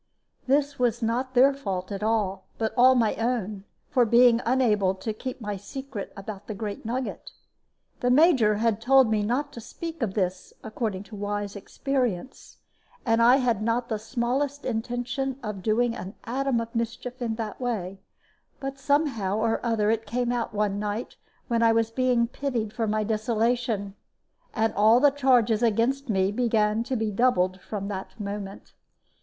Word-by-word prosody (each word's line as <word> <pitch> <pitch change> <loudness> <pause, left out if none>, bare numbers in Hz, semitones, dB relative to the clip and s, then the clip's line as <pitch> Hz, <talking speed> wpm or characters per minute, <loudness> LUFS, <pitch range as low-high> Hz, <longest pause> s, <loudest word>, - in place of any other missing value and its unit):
This 285 +1 +1
was 240 -1 +1
not 250 +3 -1
their 270 +3 +6
fault 195 -8 -4
at 200 0 -4
all, 210 -3 -1
but 220 -1 -1
all 260 +1 +6
my 230 -4 +2
own, 215 -4 -2 0.2
for 250 - +3
being 235 +1 +5
unable 210 -7 +2
to 215 +3 -4
keep 255 +5 -6
my 210 -3 -4
secret 255 +1 -7
about 200 0 -8
the 215 - -5
great 205 0 -5
nugget. 250 +3 -4 0.7
The 245 - +1
Major 255 -6 +5
had 225 0 0
told 260 -1 +5
me 215 -1 +2
not 265 +7 -1
to 235 - -8
speak 330 +7 -7
of 210 -5 -1
this, 185 -2 -2
according 215 -3 -3
to 210 +1 -11
wise 205 0 -3
experience; 250 +1 -3 0.5
and 225 -1 +3
I 240 +2 +7
had 245 -6 +1
not 235 +2 0
the 220 -2 -1
smallest 250 +6 -2
intention 250 +3 -2
of 210 -3 -5
doing 230 +3 +1
an 190 -2 -7
atom 260 +1 0
of 230 0 -5
mischief 240 +2 -4
in 230 -2 -1
that 220 +1 -5
way; 195 -6 -3 0.6
but 270 0 -5
somehow 265 -9 +1
or 225 0 0
other 220 -3 +1
it 225 -1 -2
came 240 +2 -1
out 240 -2 -2
one 205 -1 -1
night 210 +3 -4 0.3
when 235 -2 +1
I 230 -1 +5
was 225 0 +1
being 250 -1 +2
pitied 235 -4 -3
for 225 -2 -1
my 215 0 0
desolation. 220 -1 0 0.6
And 225 0 +1
all 220 +3 +5
the 285 +1 +5
charges 245 -5 +3
against 240 +4 +1
me 190 -2 +2
began 215 -1 +1
to 260 0 -2
be 220 -2 -1
doubled 190 -5 +1
from 200 -2 -5
that 195 +3 -6
moment. 200 -1 -6
230 Hz, 170 wpm, -26 LUFS, 210-250 Hz, 0.7 s, I